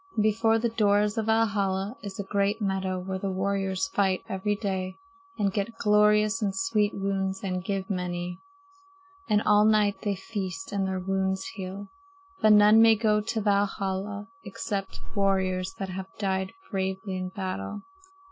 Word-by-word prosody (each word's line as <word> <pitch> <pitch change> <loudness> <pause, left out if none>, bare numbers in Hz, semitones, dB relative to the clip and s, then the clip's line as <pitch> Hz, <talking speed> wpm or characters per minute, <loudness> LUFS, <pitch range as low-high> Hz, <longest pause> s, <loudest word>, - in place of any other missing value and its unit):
And 215 - +2
before 225 +1 +3
the 235 +1 0
doors 210 -1 +2
of 220 - -2
Valhalla 205 -2 +1
is 200 -2 -7
a - - -1
great 200 +2 0
meadow 190 -2 -1
where 190 +1 -4
the 195 - -2
warriors 195 +3 -1
fight 190 -6 +1
every 195 +2 -1
day 190 -2 -3 0.4
and 200 -2 +1
get 215 +3 -2
glorious 210 +1 +3
and 200 -2 0
sweet 210 0 +1
wounds 195 -1 -2
and 185 -2 -2
give 195 -1 -2
many. 180 -2 -3 0.9
And 210 0 +3
all 210 0 +5
night 210 -2 +3
they 205 -1 -1
feast, 190 -3 -5
and 195 -2 0
their 190 0 -2
wounds 190 0 -1
heal. 195 +1 -7 0.5
But 215 -1 +6
none 210 +1 +7
may 225 0 +7
go 210 -1 +2
to 220 +1 -2
Valhalla 200 0 -1 0.2
except 195 -1 -4
warriors 190 -2 0
that 195 0 -5
have 190 +1 -5
died 190 -2 -1 0.2
bravely 190 0 -2
in 185 0 -3
battle. 185 - -5
195 Hz, 155 wpm, -27 LUFS, 190-210 Hz, 0.9 s, none